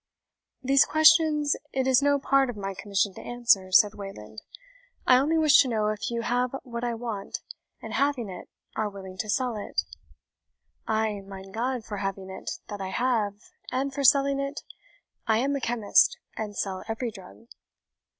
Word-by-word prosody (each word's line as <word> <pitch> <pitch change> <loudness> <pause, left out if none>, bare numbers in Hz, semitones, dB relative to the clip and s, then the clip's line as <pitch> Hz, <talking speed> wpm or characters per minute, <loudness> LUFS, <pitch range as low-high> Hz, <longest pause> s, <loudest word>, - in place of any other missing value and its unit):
"These 275 +1 +5
questions 310 -2 +4 0.2
it 265 -1 0
is 260 0 +4
no 285 0 +3
part 275 -1 +2
of 240 - -6
my 195 -1 -4
commission 200 0 -1
to - - -10
answer," 230 -6 +1
said 205 +2 +6
Wayland; 150 - -9 0.6
"I 255 - +6
only 310 +5 +1
wish 310 -3 +6
to 270 - 0
know 215 -3 0
if 215 -1 -3
you 235 -1 -2
have 245 +2 0
what 235 -2 -6
I 240 -1 -1
want, 225 -4 -5 0.4
and - - -7
having 280 -5 0
it, 180 -2 -9 0.3
are 215 -1 -1
willing 190 -2 -10
to 215 - -3
sell 250 0 0
it?" 210 - -2 1.0
"Ay, 220 -2 0
mein 195 0 -10
God, 240 +2 -2
for 205 - -5
having 195 -1 -4
it, 190 - -5
that 205 -2 -6
I 190 - -4
have, 215 -2 -1 0.2
and 270 +1 -1
for 280 0 -3
selling 275 0 +4
it, 275 +1 -4 0.6
I 220 -1 +3
am 275 +4 0
a 280 - -3
chemist, 230 -4 +3 0.2
and 210 -2 -5
sell 190 -2 -3
every 225 +1 -3
drug." 190 +3 -14
230 Hz, 175 wpm, -27 LUFS, 200-270 Hz, 1.0 s, said